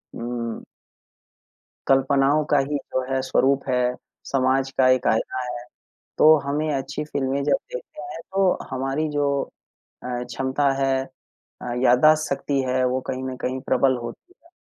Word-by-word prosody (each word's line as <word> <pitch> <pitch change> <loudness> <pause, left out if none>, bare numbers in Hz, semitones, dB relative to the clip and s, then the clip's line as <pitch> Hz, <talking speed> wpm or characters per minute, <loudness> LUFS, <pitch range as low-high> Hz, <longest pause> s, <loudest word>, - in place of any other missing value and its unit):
उम 115 -1 -4 1.3
कल्पनाओं 135 +2 +3
का 145 - +5
ही 140 +2 0
जो 130 -1 -3
है 135 - +1
स्वरूप 135 +1 +2
है, 125 -1 +1 0.3
समाज 135 0 +1
का 130 - +5
एक 130 -1 +2
आईना 120 +3 0
है, 120 0 -6 0.5
तो 155 +1 +8
हमें 150 +2 -1
अच्छी 140 +2 -3
फ़िल्में 140 -2 -2
जब 150 - +3 0.2
देखते 465 - -8
हैं 145 +2 -7
तो 195 -2 +3
हमारी 135 +4 -1
जो 145 -1 0 0.8
अ, - - -6 0.2
क्षमता 135 +3 0
है, 135 0 +1 0.6
अ, - - -4
याददाश्त 155 +5 +5
शक्ति 140 0 -1
है, 130 0 +1
वो 125 +1 0
कहीं 130 - -4
न 130 -1 -4
कहीं 130 +1 -2
प्रबल 130 0 +3
होती 120 - -9
है 335 - -21
135 Hz, 150 wpm, -23 LUFS, 130-145 Hz, 1.3 s, तो